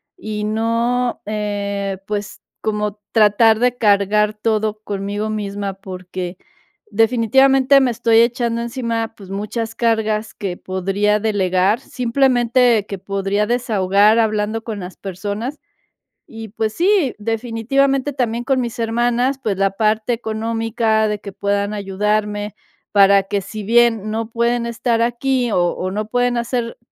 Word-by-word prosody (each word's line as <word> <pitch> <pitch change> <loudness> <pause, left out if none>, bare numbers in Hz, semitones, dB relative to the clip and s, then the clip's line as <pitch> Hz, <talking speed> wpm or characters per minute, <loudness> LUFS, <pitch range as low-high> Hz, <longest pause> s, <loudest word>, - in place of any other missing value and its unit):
y 215 - -4
no, 230 +3 0
eh, 200 -2 -3
pues, 210 0 -4 0.2
como 210 -1 -2
tratar 220 0 +4
de 245 0 +2
cargar 210 0 +2
todo 215 0 -1
conmigo 205 +1 -3
misma, 200 -2 -3
porque, 185 -1 -7 0.5
definitivamente 260 +5 +4
me 255 -2 +2
estoy 225 0 +3
echando 235 -1 0
encima, 230 -2 -3
pues, 195 -3 -12
muchas 215 +3 -4
cargas 220 -2 0
que 195 -4 -4
podría 195 +3 0
delegar, 200 0 +1
simplemente, 245 -3 +2
que 195 - -5
podría 200 +2 -1
desahogar 210 -3 +3
hablando 215 0 0
con 220 -3 -5
las 180 0 -8
personas. 205 +8 -5 0.7
Y, 225 -1 -9
pues, 215 +1 -2
sí, 350 - +2
definitivamente 245 +5 0
también, 240 -3 -2
con 265 0 +1
mis 240 -2 -4
hermanas, 240 +3 +1
pues, 205 -6 -1
la 195 0 +2
parte 215 +3 0
económica, 225 0 0
de 210 -1 -2
que 200 0 -8
puedan 200 +1 -1
ayudarme, 210 +1 -1 0.4
para 200 -1 +5
que 200 +1 -2
si 210 +3 -7
bien 225 -1 +3
no 220 +1 -3
pueden 235 +1 0
estar 235 0 0
aquí, 245 +1 0
o 185 - +2 0.2
o 185 +1 -3
no 210 +2 -3
pueden 245 +1 +1
hacer 235 0 -2
220 Hz, 135 wpm, -19 LUFS, 205-235 Hz, 0.7 s, para